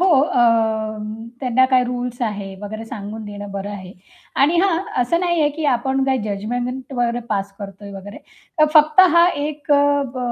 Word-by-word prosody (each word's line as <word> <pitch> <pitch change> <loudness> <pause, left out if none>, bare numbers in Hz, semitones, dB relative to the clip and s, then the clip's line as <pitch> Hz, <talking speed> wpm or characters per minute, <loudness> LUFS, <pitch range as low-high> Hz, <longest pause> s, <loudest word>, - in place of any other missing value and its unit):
हो, 375 - +4
अ, 250 -5 +1 1.0
त्यांना 260 0 +3
काय 255 -1 +3
रुल्स 245 0 -4
आहे 200 -3 -3
वगैरे 220 +2 -6
सांगून 215 0 -7
देणं 205 -1 -8
बरं 200 +1 -5
आहे. 185 -2 -8 0.4
आणि 295 +6 +3
हां, 370 -3 +2 0.2
असं 335 +8 0
नाहीये 345 -4 +2
की 320 - -3
आपण 265 +2 -1
काय 265 -1 +1
जजमेंट 245 +6 -4
वर 240 -1 0
पास 200 -1 -2
करतोय 200 0 -9
वगैरे. 200 +1 -9 0.4
तर 305 - +7
फक्त 305 +2 +6
हा 340 +1 +7 0.2
एक 300 -1 -3
अ, 285 0 +3
ब - - -5
245 Hz, 170 wpm, -20 LUFS, 205-285 Hz, 1.0 s, तर